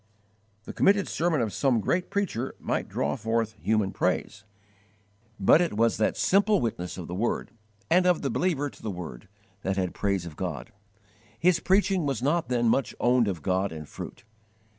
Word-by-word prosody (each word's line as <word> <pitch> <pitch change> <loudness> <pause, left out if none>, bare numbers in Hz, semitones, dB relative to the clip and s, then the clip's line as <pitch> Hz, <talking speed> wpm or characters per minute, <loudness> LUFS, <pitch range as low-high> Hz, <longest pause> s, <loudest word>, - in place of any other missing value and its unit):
The - - -8
committed 200 -1 +3
sermon 165 -4 0
of 110 -3 -2
some 130 -5 +2
great 175 - 0
preacher 160 - -2
might - - -2
draw 75 +1 -1
forth 115 0 -1
human 105 -3 +1
praise, - - -1 1.0
but 105 - +6
it 170 -10 -1
was 115 +1 +3
the 110 - +2
simple 200 +1 +3
witness 90 -6 -3
of 90 - -6
the 90 - -6
Word, 105 +6 -1 0.4
and 180 +2 +4
of 180 -4 +2
the 135 - 0
believer 150 -1 0
to - - -12
the 110 - -4
Word, 85 -10 -7 0.3
that 95 0 -2
had 90 -2 -1
praise 100 -3 -1
of 80 -3 -8
God. - - -5 0.7
His 175 +3 +3
preaching 190 -3 +2
was 135 -3 -2
not 150 -1 +1
then 120 -2 +1
much 135 +4 +1
owned 120 -2 +3
of 90 -6 -3
God 95 +1 0
in 80 -1 -7
fruit. - - -9
120 Hz, 180 wpm, -27 LUFS, -, 1.0 s, but